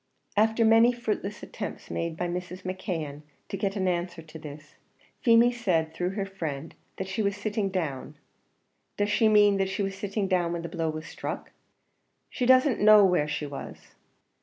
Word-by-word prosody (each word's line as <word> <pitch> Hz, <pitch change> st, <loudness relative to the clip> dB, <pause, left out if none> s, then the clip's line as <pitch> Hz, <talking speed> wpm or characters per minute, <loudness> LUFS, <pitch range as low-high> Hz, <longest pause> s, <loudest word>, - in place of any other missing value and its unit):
After 220 Hz, +2 st, +3 dB
many 225 Hz, +2 st, +6 dB
fruitless 215 Hz, -4 st, -4 dB
attempts -, -, -7 dB
made 165 Hz, -1 st, -3 dB
by 175 Hz, -, -1 dB
Mrs. 180 Hz, +1 st, -5 dB
McKeon 170 Hz, -6 st, -4 dB, 0.3 s
to -, -, -3 dB
get 195 Hz, 0 st, -2 dB
an 190 Hz, -2 st, 0 dB
answer 175 Hz, -1 st, -2 dB
to 160 Hz, 0 st, -11 dB
this, 150 Hz, -1 st, -10 dB, 0.5 s
Feemy 235 Hz, 0 st, +5 dB
said, 175 Hz, -10 st, 0 dB
through 180 Hz, +2 st, -1 dB
her 200 Hz, -2 st, -1 dB
friend, 160 Hz, -6 st, -5 dB, 0.2 s
that 190 Hz, -, -4 dB
she 190 Hz, +3 st, -2 dB
was 200 Hz, -1 st, 0 dB
sitting 205 Hz, -1 st, -1 dB
down. 160 Hz, -9 st, -3 dB, 0.8 s
"Does 205 Hz, 0 st, +1 dB
she 220 Hz, +1 st, +4 dB
mean 205 Hz, -2 st, +5 dB
that 195 Hz, 0 st, 0 dB
she 200 Hz, +1 st, -2 dB
was 195 Hz, 0 st, -3 dB
sitting 200 Hz, 0 st, -2 dB
down 175 Hz, -3 st, +1 dB
when 170 Hz, -1 st, -4 dB
the 170 Hz, -, -5 dB
blow 165 Hz, -1 st, -2 dB
was 155 Hz, 0 st, -5 dB
struck?" -, -, -6 dB, 0.8 s
"She 250 Hz, -, -1 dB
doesn't 260 Hz, -1 st, +5 dB
know 210 Hz, -1 st, +8 dB
where 180 Hz, -5 st, +2 dB
she 150 Hz, -, -3 dB
was." 140 Hz, -1 st, -9 dB
190 Hz, 180 wpm, -27 LUFS, 165-210 Hz, 0.8 s, know